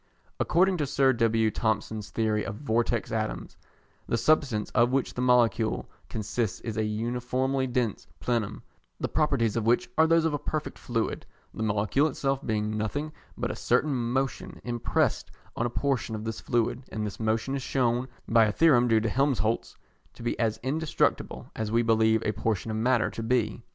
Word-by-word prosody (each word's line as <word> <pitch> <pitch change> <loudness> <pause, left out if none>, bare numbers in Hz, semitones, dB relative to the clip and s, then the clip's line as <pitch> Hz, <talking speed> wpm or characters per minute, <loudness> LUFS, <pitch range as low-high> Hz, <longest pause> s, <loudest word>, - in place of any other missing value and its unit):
According 185 +2 +3
to 150 -3 -1
Sir 135 0 +3
W. 115 -2 +2
Thomson's 110 -1 -2
theory 110 -1 0
of 100 - -5
Vortex 115 -1 0
Atoms, - - -3 0.5
the 115 - +1
substance 135 -7 +2
of 120 0 +4
which 135 0 0
the 125 - -3
molecule 120 -3 +2 0.2
consists 110 0 -2
is 115 -2 -4
a 110 - 0
uniformly 125 +5 -1
dense 120 -4 -1
plenum, 115 -4 -2 0.4
the - - -1
properties 135 -8 +1
of 115 -1 -1
which 120 0 +2
are 160 - +6
those 165 0 +4
of 160 - +1
a 145 - -1
perfect 155 +1 -4
fluid, 115 -2 -2 0.3
the - - -6
molecule 110 +7 +2
itself 135 -1 -1
being 110 -2 -1
nothing 145 +9 -2 0.3
but - - -1
a - - -5
certain 150 -1 +1
motion 130 +2 -2
impressed 120 -1 0 0.3
on 120 - 0
a - - -4
portion 130 -2 -1
of 105 - -5
this 110 0 -4
fluid, 120 +1 0
and 110 -1 -3
this 105 - -6
motion 110 +4 0
is 135 - -3
shewn, 125 -1 0 0.2
by 115 -1 +5
a 105 - +1
theorem 125 -3 +4
due 110 -2 +4
to 115 - 0
Helmholtz, 120 -3 0 0.4
to - - -11
be 120 - 0
as 110 -2 +1
indestructible 150 +4 -1
as 110 -1 -3
we 115 +1 +3
believe 110 0 +3
a 105 - +2
portion 110 +1 -1
of 110 - -2
matter 120 +1 +2
to - - -6
be. 115 -1 0
115 Hz, 180 wpm, -27 LUFS, 110-130 Hz, 0.5 s, are